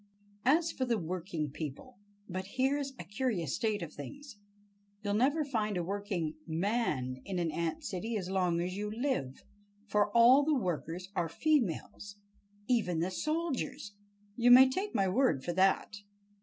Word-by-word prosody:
As 325 +6 +4
for 260 - -3
the 240 -3 +1
working 170 -4 -3
people—But 190 +6 -8
here's 270 +1 +1
a - - -6
curious 200 - -2
state 215 -4 -1
of 160 - -8
things! 275 - -10 0.6
You'll 205 -1 -1
never 285 +8 +2
find 215 -7 -1
a 175 - -1
working 185 -5 -3
"man" 160 - -1
in 190 -2 -4
an 170 -2 0
ant 165 0 -2
city 220 +5 -3
as 185 -3 -4
long 180 -3 +1
as 180 +1 -3
you 210 +1 -3
live, 220 - -2 0.4
for 210 0 +2
all 250 +5 +7
the 300 0 +2
workers 180 - -3
are 170 -2 0
females, 205 - -1 0.5
even 215 -10 +1
the 175 +3 -1
soldiers, 305 - -2 0.4
you 245 0 +3
may 255 +2 +10
take 400 +8 -3
my 195 - +3
word 210 - +2
for 175 - -2
that! 190 +3 +2
205 Hz, 155 wpm, -32 LUFS, 175-250 Hz, 0.6 s, may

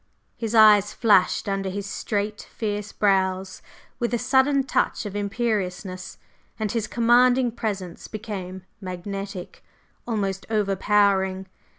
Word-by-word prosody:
His 230 -1 -3
eyes 210 -2 +6
flashed 205 -5 +3
under 195 -1 -1
his 200 +1 -4
straight, 205 +1 -3
fierce 210 -1 -3
brows 190 -2 0 0.4
with 240 0 0
a - - +1
sudden 265 +3 +3
touch 265 - 0
of 205 -1 -6
imperiousness, 200 -3 -3 0.4
and 215 -2 -2
his 225 -2 -1
commanding 245 +1 +4
presence 195 -6 -5
became 195 -4 -6 0.2
magnetic, 195 +1 -6 0.4
almost 195 -4 -2
over 205 -3 +1
powering. 190 -1 +2
205 Hz, 115 wpm, -24 LUFS, 190-225 Hz, 0.4 s, eyes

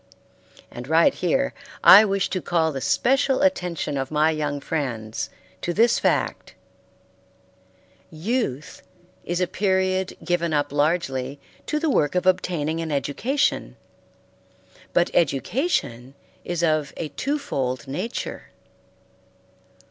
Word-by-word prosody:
And 120 +1 -8
right 160 +2 +4
here 270 +10 0 0.3
I 205 +3 +10
wish 195 -2 0
to 185 - -1
call 160 -2 +1
the 135 -2 -5
special 270 - +2
attention 180 - 0
of 135 -1 -3
my 155 +1 +2
young 150 -2 -2
friends 125 -8 -3 0.3
to 175 - -2
this 230 +2 +4
fact: - - -1 1.5
Youth 160 - -3 0.4
is 175 +1 -2
a 180 - +2
period 190 -1 0
given 170 -2 0
up 145 -2 0
largely 145 -3 -1 0.3
to 300 - 0
the 310 -1 0
work 145 - +1
of 180 - +1
obtaining 165 -4 0
an 160 -1 -4
education; 230 - -1 1.2
but 175 - +2
education 140 - 0 0.3
is 175 -1 -3
of 155 -3 +1
a 155 - -4
two 285 - -2
fold 130 - -3
nature. 155 - -5
165 Hz, 120 wpm, -23 LUFS, 145-190 Hz, 1.5 s, I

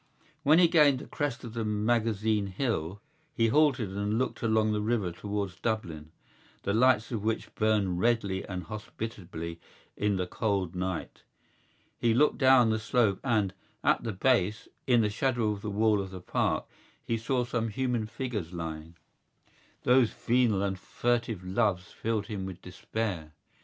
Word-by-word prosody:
When 155 +1 +5
he 175 -1 +7
gained 150 -5 +5
the - - -8
crest 145 -4 -3
of 115 -2 -7
the 115 -1 -2
Magazine 110 -1 +1
Hill 95 - -2 0.4
he 115 0 +3
halted 130 -7 +3
and 105 +2 0
looked 130 - -2
along 110 -2 +2
the 105 0 0
river 105 -4 0
towards 100 0 -4
Dublin, 85 -9 -3 0.5
the 100 - 0
lights 115 0 +3
of 110 -4 -3
which 110 +1 -2
burned 105 -5 +1
redly 100 -4 +1
and 90 -2 -5
hospitably 90 -4 -6 0.4
in 105 -1 +1
the 90 -1 -1
cold 95 -2 -1
night. 90 -1 -4 0.8
He 115 -1 +2
looked 150 +4 +3
down 130 -4 +6
the 110 - 0
slope 110 -3 +1
and, 105 -7 +1 0.3
at - - +3
the 115 - -2
base, 110 0 +1 0.2
in 120 -3 +5
the 105 - +2
shadow 120 -1 +1
of 100 -1 -5
the 105 - -4
wall 105 0 +2
of 95 - -6
the 95 0 -8
Park, 90 - 0 0.4
he 115 - 0
saw 125 +3 0
some 120 -1 -1
human 120 0 -1
figures 110 -8 -4
lying. 80 -1 -6 0.9
Those 125 -2 +5
venal 115 -5 +1
and 95 -1 -2
furtive 115 -3 -1
loves 95 -1 0
filled 110 -2 -2
him 100 -3 -4
with 90 -2 -8
despair. 90 -4 -4
110 Hz, 160 wpm, -29 LUFS, 95-120 Hz, 0.9 s, he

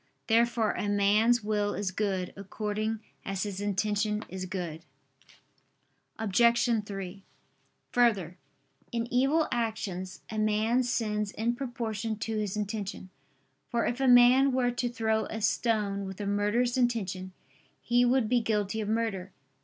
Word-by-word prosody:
Therefore 230 -1 +3
a 205 - -2
man's 210 +4 +3
will 205 -1 0
is 200 -2 -2
good, 190 -2 -2
according 210 +2 -3 0.2
as 195 -1 -2
his 200 -2 -4
intention 210 +1 0
is 185 0 -5
good. 175 -4 -5 1.3
Obj. 235 +2 +3 0.3
3: 195 -1 -7 0.7
Further, 205 -8 +2 0.6
in 230 0 -2
evil 275 +6 +3
actions, 210 -6 -3
a 215 - -2
man 215 +3 +2
sins 210 -4 -1
in 225 +3 -1
proportion 230 -4 -3
to 220 +1 -3
his 210 -1 -2
intention: 205 -3 -4 0.6
for 235 - 0
if 245 - -1
a 270 - +2
man 250 +2 +7
were 250 -1 +1
to 245 0 -2
throw 220 -2 0
a 220 - -5
stone 210 -3 0
with 190 +1 -8
a 205 - -3
murderous 210 +5 +1
intention, 195 -7 -1 0.5
he 240 +1 +2
would 245 -1 +3
be 245 +1 +2
guilty 215 -1 -1
of 210 - -3
murder. 215 -4 -1
215 Hz, 140 wpm, -29 LUFS, 200-235 Hz, 1.3 s, man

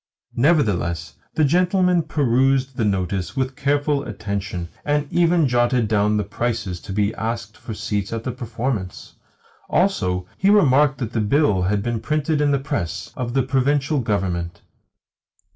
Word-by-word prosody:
Nevertheless 100 - +1 0.2
the 155 - +3
gentleman 180 +2 +3
perused 135 -3 +1
the 115 - -1
notice 95 0 -1
with 130 -1 -1
careful 145 0 0
attention, 100 -6 -4
and 145 0 0
even 170 -3 +3
jotted 120 -1 +2
down 105 0 +2
the 105 - 0
prices 110 -3 -3
to 100 - -9
be 105 +2 0
asked 115 -1 -4
for 110 - -8
seats 105 -2 -2
for 115 - -3
the 115 +3 -4
performance. 120 -5 -4 0.6
Also, 90 - +1
he 195 - +3
remarked 145 -8 +4
that 120 -3 -4
the 110 - 0
bill 105 -3 +2
had 100 +2 0
been 120 -1 -1
printed 150 +4 0
in 145 - +3
the 140 - +3
press 135 - -4
of 120 0 -4
the 135 - +3
Provincial 140 +3 +1
Government. 90 -6 -2
120 Hz, 150 wpm, -22 LUFS, 105-145 Hz, 0.6 s, remarked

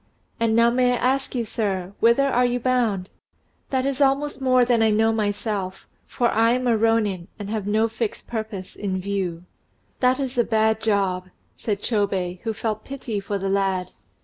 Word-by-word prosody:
"And 230 -1 +2
now 235 +1 +5
may 250 0 +3
I - - +2
ask 265 +2 0
you, 235 -2 0
sir, 195 -4 -2
whither 235 +4 +4 0.2
you 245 0 +1
are - - -4
bound?" 235 -7 0 0.6
"That 260 -1 0
is 275 0 -1
almost 280 +1 +1
more 255 -1 +4
than 240 -2 +2
I 220 - +4
know 220 +1 +3
myself, 205 -3 -2 0.2
for 240 -1 +1
I 230 +2 +3
am 255 0 -1
a 235 -2 +3
rônin, 215 -5 +1
and 205 -1 -6
have 215 -3 -2
no 215 +2 +2
fixed 225 -1 -4
purpose 220 -5 -5
in 190 -2 -2
view." 185 -3 -3 0.6
"That 255 +1 +3
is 260 -2 -2
a - - +5
bad 220 -1 +1
job," 195 -4 0 0.3
said 205 -2 -3
Chôbei, 195 -5 -1
who 225 - -2
felt 215 0 -3
pity 255 -6 -4
for 200 +1 -3
the 195 0 -2
lad. 195 -2 0
220 Hz, 185 wpm, -23 LUFS, 200-245 Hz, 0.6 s, now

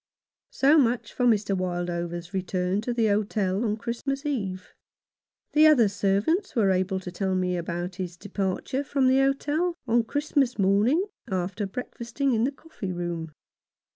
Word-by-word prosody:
So 290 +4 +4
much 245 -3 +1
for 250 - 0
Mr. 205 -3 +2
Wildover's 175 -1 -3
return 185 +1 -1
to 245 - -3
the 235 -2 +1
hotel 205 -1 +1
on 215 -2 0
Christmas 270 +5 -3
Eve. 195 -10 -3 0.8
The 310 +1 +6
other 260 -8 +6
servants 205 - 0
were 205 -5 +3
able 190 +1 0
to 180 - -7
tell 190 +1 -1
me 180 -1 0
about 175 +1 -4
his 180 -2 -5
departure 200 +7 -2
from 275 -1 0
the 260 +1 +4
hotel 290 +6 +1
on 235 -1 +2
Christmas 285 -1 0
morning, 210 - +3 0.2
after 190 +2 -2
breakfasting 250 +4 -3
in 225 +1 +2
the 275 - 0
coffee 275 - -7
room. 170 -2 -4
205 Hz, 150 wpm, -26 LUFS, 185-265 Hz, 0.8 s, The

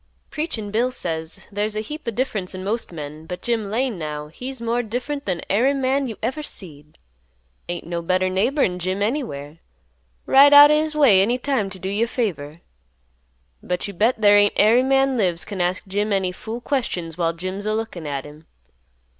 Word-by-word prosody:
Preachin' 240 -10 -4
Bill 235 +4 +1
says 165 -5 -4
"There's 210 +1 -2
a - - -1
heap 300 +5 -8
o' - - +2
difference 215 -6 -2
in 185 - -6
most 220 +2 -2
men, 155 0 -8
but 180 +1 -6
Jim 225 -4 -1
Lane 235 -2 -1
now 150 -1 -5
he's 255 +10 -7
more 235 +1 0
different 250 +5 -4
than 180 -3 -2
ary 250 +8 +2
man 270 0 0
you 220 -4 -6
ever 285 +4 -1
seed. 150 - -9 0.7
Ain't 175 - -4
no 170 0 -3
better 185 +2 +1
neighbor'n 190 0 +1
Jim 185 +3 -1
anywhere. 165 - -3 0.7
Ride 285 +2 +7
out 290 +1 +10
o' - - +5
his 310 -1 -2
way 250 -11 +6
any 235 +5 +2
time 255 -6 -1
t' 190 - -8
do 185 - -6
you 205 +4 +1
a - - -8
favor. 170 - -3 1.0
But 180 +2 -3
you 200 - -7
bet 220 +6 +1
there 205 -1 +6
ain't 205 0 +3
ary 225 +4 +5
man 270 0 +2
lives 180 -6 0
can 200 -3 -4
ask 180 +3 -1
Jim 205 +2 -1
any 190 -2 +1
fool 220 +6 -7
questions 180 - -2
while 165 -1 0
Jim's 185 +4 -5
a 215 - +1
lookin' 200 -8 -4
at 140 -2 -3
him. 150 +2 -14
205 Hz, 195 wpm, -22 LUFS, 180-245 Hz, 1.0 s, out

